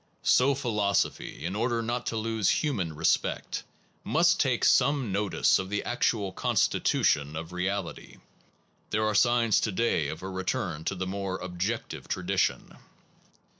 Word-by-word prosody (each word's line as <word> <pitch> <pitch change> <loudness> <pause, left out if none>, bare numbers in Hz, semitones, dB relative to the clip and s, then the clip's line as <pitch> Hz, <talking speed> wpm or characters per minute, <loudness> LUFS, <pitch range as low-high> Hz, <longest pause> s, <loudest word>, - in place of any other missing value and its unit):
So 135 +2 +4
philosophy, 105 -11 -1
in 90 +3 -3
order 115 +1 0
not 120 +2 -3
to 115 - -2
lose 110 -2 0
human 95 - 0
respect, 85 +2 0 0.4
must - - +3
take - - +2
some 135 -4 +3
notice 100 +1 +2
of 95 0 -4
the 105 +1 -2
actual 110 -5 0
constitution 75 -4 +1
of 80 +2 -6
reality. 95 +1 -4 0.7
There 110 0 0
are 110 - +1
signs 120 0 +3
to 110 - -1
day 95 -7 +1
of 80 +4 -6
a 95 - -4
return 95 -4 -3
to 95 - -1
the 95 0 -3
more 95 0 -3
objective 95 +6 -4
tradition. - - -1
100 Hz, 140 wpm, -28 LUFS, 90-115 Hz, 0.7 s, So